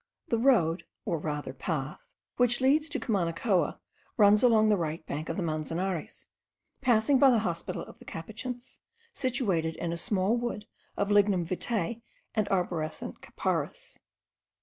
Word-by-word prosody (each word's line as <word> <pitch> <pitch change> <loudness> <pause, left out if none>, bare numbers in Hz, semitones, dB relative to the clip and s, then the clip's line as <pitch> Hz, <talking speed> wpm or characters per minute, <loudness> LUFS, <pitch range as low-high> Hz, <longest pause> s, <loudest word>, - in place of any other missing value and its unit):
The 230 - +1
road, 195 -10 +3 0.2
or 165 - -1
rather 150 -3 -4
path, 135 +1 -4 0.3
which 245 -1 +3
leads 295 +4 +3
to - - -2
Cumanacoa, 185 - 0 0.4
runs 210 -1 +6
along 220 -3 +5
the 210 - +5
right 160 -3 -3
bank 150 +3 -4
of 165 - -3
the 190 - -1
Manzanares, 165 +2 -3 0.6
passing 255 +1 +4
by 275 - +7
the 245 - +5
hospital 170 -1 -3
of - - -13
the - - -15
Capuchins, 240 +8 -6 0.3
situated 205 - 0
in 170 -1 -3
a - - -3
small 200 +2 +1
wood 235 -3 -3 0.3
of 200 0 0
lignum 200 -4 +4
vitae 215 +4 -2 0.3
and 215 -3 0
arborescent 175 -4 -2
capparis. - - -3
200 Hz, 145 wpm, -29 LUFS, 165-240 Hz, 0.6 s, by